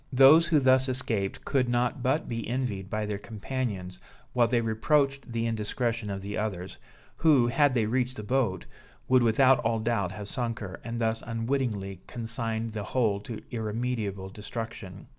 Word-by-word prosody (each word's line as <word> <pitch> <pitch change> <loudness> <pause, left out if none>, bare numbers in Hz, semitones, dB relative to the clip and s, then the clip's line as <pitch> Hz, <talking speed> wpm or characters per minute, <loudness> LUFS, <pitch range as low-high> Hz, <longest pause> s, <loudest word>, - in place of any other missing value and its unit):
Those 140 +6 +7
who 155 -3 +4
thus 130 0 +4
escaped 115 -6 -1
could 130 -3 +1
not 120 +2 0
but 135 +6 +1
be 115 -2 -4
envied 115 -6 -2
by 110 0 -1
their 105 -1 -3
companions, 105 -4 -4 0.3
while 120 -2 +4
they 120 +1 +2
reproached 135 +4 +1
the 115 0 -1
indiscretion 115 0 -1
of 95 -1 -4
the 100 +1 -3
others, 95 -4 -4 0.4
who, 145 -7 +5
had 135 +2 +3
they 115 -3 +2
reached 125 +3 0
the 105 - -5
boat, 110 -5 0 0.4
would 130 -1 +5
without 130 +3 +5
all 115 0 +1
doubt 110 -5 0
have 105 -1 -7
sunk 115 0 -2
her, 95 -3 -7
and 115 0 -4
thus 115 -1 0
unwittingly 115 -5 -2
consigned 115 -1 -3
the 110 - -3 0.2
whole 110 -5 +2
to 110 +2 -8
irremediable 110 -4 -3
destruction. 105 -2 -7
115 Hz, 165 wpm, -28 LUFS, 105-125 Hz, 0.4 s, Those